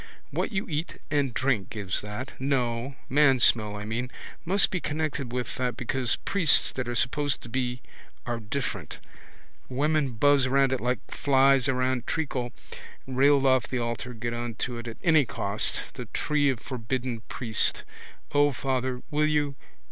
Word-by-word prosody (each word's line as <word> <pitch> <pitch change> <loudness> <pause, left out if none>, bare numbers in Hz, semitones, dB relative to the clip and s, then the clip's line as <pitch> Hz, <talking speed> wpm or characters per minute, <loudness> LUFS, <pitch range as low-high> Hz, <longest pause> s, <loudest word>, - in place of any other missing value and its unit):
What - - -1
you 205 0 -2
eat 155 +1 -4
and 145 -3 +1
drink 125 -5 0
gives 100 -4 -2
that. 105 +6 -6
No. 130 -1 -1
Mansmell, 130 -7 +4
I 105 0 -6
mean. 120 +3 -3 0.4
Must 195 +4 +4
be 185 - 0
connected 150 -4 -2
with 125 0 -3
that 125 -1 -1
because 125 0 +2
priests 175 -6 +5
that 130 -2 -4
are 120 - -2
supposed 145 +4 +1
to 120 - -9
be 125 0 -2 0.4
are 120 -1 -2
different. 120 +5 -4 0.7
Women 145 0 +1
buzz 140 +3 +4
round 135 0 +3
it 130 - -2
like 125 +2 0
flies 135 -1 +3
round 130 -1 0
treacle. 135 -6 -2 0.5
Railed 135 +1 +3
off 130 -3 +3
the 130 - -2
altar 120 +1 -3
get 120 +1 -3
on 120 -1 -4
to 120 +1 -3
it 115 - -8
at 115 - -7
any 160 -3 +5
cost. 115 - -2
The - - -7
tree 145 -1 +1
of 130 -4 -1
forbidden 125 -1 -4
priest. 115 -4 +1 0.5
O, 145 0 +4
father, 130 -1 -2
will 150 +1 +2
you? 150 -2 +1
130 Hz, 160 wpm, -27 LUFS, 120-140 Hz, 0.7 s, priests